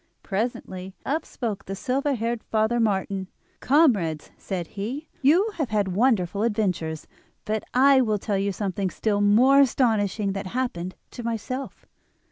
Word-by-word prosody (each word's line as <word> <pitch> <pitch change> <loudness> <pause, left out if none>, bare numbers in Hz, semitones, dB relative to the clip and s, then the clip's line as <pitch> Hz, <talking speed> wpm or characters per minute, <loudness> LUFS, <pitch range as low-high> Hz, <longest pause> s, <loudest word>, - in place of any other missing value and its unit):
Presently 190 -3 -4
up 310 +4 -1
spoke 220 -5 -4
the 195 - -5
silver 270 +6 0
haired 230 0 -2
Father 220 +2 +1
Martin. 195 -3 0 0.3
"Comrades," 215 - +2
said 185 -3 -4
he, 245 +10 -5
"you 345 +11 +4
have 295 -7 -1
had 205 -3 +1
wonderful 200 -2 +1
adventures; 185 -8 -1 0.4
but 215 0 -1
I 270 +1 +6
will 215 -4 +1
tell 200 -1 -1
you 200 +1 0
something 195 -1 -2
still 205 +2 -1
more 240 +7 +5
astonishing 220 -6 +2
that 195 -1 -4
happened 185 -8 -2 0.2
to 245 - -7
myself. 235 +3 -4
215 Hz, 140 wpm, -25 LUFS, 195-255 Hz, 0.4 s, I